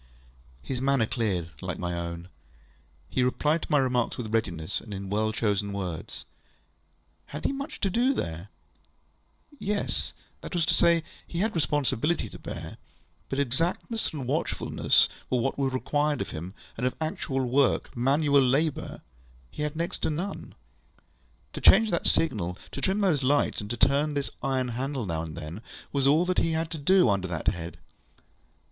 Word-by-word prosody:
ŌĆØ 60 +1 -27
His 125 -2 -2
manner 135 -3 +3
cleared, 95 -8 -1
like - - -3
my 90 -1 -2
own. 85 0 -4 0.8
He - - 0
replied 150 +5 +2
to - - -6
my 150 - +5
remarks 125 -3 +1
with 110 -3 -5
readiness, 90 -6 -1
and 105 -3 -7
in 95 0 -6
well 110 +1 +1
chosen 100 -2 0
words. 90 -5 -5 1.0
Had 150 - -7
he - - +3
much 275 +3 -5
to 195 - +2
do 245 +6 +3
there? 85 - -3 1.1
Yes; 205 0 -1 0.3
that - - -6
was 170 -2 +3
to - - +2
say, 170 -1 +4 0.2
he 170 - -6
had 220 - +3
enough - - -14
responsibility 150 +1 +1
to - - -11
bear; - - -7 0.5
but 135 - -2
exactness 165 - 0
and 145 -5 -5
watchfulness - - +2 0.2
were 130 - +2
what 135 +4 -1
was 135 -1 +1
required 145 +4 0
of - - -3
him, 90 +4 -6 0.2
and 125 +2 +1
of 130 - -2
actual 155 -4 -1
workŌĆömanual 140 +3 +3
labourŌĆöhe - - -8 0.6
had 150 +1 -2
next 170 +2 -2
to - - 0
none. 175 +6 -4 1.0
To - - -6
change 220 +1 +7
that 170 - +1
signal, 95 - +1
to - - -5
trim 195 +2 +1
those 170 -8 +3
lights, 140 -2 +2
and 105 - -7
to 120 - -2
turn 145 +2 +3
this 140 -1 -1
iron 130 -2 0
handle 130 +1 -2
now 80 -3 -2
and 80 -1 -6
then, 85 +5 -6 0.3
was 140 -1 +2
all 155 +5 +5
he 165 - +2
had 160 0 -1
to 160 - -4
do 185 +4 +5
under 100 -3 +1
that 85 -3 0
head. 85 -3 -5
130 Hz, 170 wpm, -28 LUFS, 100-155 Hz, 1.1 s, change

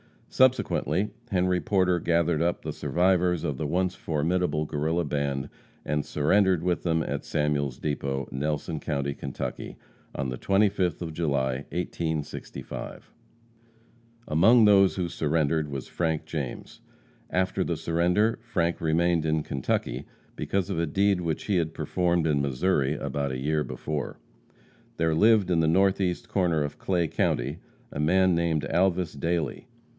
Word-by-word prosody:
Subsequently, 105 - +2 0.2
Henry 90 -1 +1
Porter 90 +1 +2
gathered 85 -1 +1
up 85 +1 0
the - - -4
survivors 90 -1 +1
of 70 - -2
the 75 - -2
once 90 +4 0
formidable 80 -1 -1
Guerrilla 80 +4 -1
band, 70 -2 -2 0.4
and 75 0 -1
surrendered 90 +3 +2
with 90 -1 0
them 80 -2 +1
at - - -4
Samuel's 75 -4 -1
depot, 70 -2 -2
Nelson 75 +3 -2
county, 70 -2 -2
Kentucky, 70 -1 -6 0.4
on 65 -1 -2
the 65 - -4
25th 95 -3 +1
of 80 -2 -5
July, 70 -5 -1
1865. 80 -3 -5 1.2
Among 110 +10 +5
those 100 -2 +5
who 90 -2 -1
surrendered 80 -1 0
was 70 -2 -5
Frank 80 -2 -1
James. 70 -6 -6 0.5
After 95 0 0
the - - -2
surrender, 90 +8 +1
Frank 85 -7 -1
remained 85 0 +2
in 80 -1 +1
Kentucky 70 -3 -2 0.3
because 95 -3 -1
of - - -1
a 85 - 0
deed 95 +3 +2
which 80 -2 -2
he 100 -3 +1
had 80 -2 -1
performed 85 -2 0
in 75 -3 +2
Missouri 70 +1 +1
about 70 -1 -2
a - - -3
year 75 +2 +1
before. 75 -3 -4 0.8
There 80 -1 +2
lived 105 +2 +4
in 85 - +3
the 80 - +3
northeast 95 +1 +1
corner 85 -6 +1
of 75 0 -6
Clay 90 -3 0
county 70 +1 -1 0.3
a - - -6
man 95 +4 +3
named 85 -2 +1
Alvas 90 -1 +1
Dailey. 85 - -2
80 Hz, 140 wpm, -27 LUFS, 75-90 Hz, 1.2 s, Among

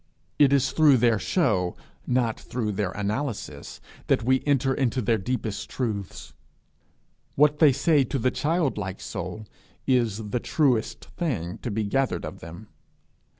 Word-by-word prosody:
It 140 -2 +6
is 135 -1 +3
through 150 -3 +5
their 115 -2 +3
show, 100 - +1 0.3
not 120 -3 +1
through 115 -4 -3
their 100 -1 -1
analysis, 105 - -4 0.3
that 110 - +2
we 130 +2 +2
enter 135 -2 +2
into 130 -2 0
their 115 -1 +1
deepest 110 -1 -3
truths. 105 -7 -4 1.0
What 150 +1 +4
they 155 -3 +7
say 145 +2 +3
to 135 - -2
the 130 +1 +1
childlike 140 - -1
soul 95 +3 -6 0.4
is 110 -5 0
the 125 - 0
truest 125 -5 0
thing 100 - -2
to - - -4
be 110 0 -1
gathered 135 +6 0
of - - -8
them. 85 +6 -11
120 Hz, 145 wpm, -25 LUFS, 105-135 Hz, 1.0 s, they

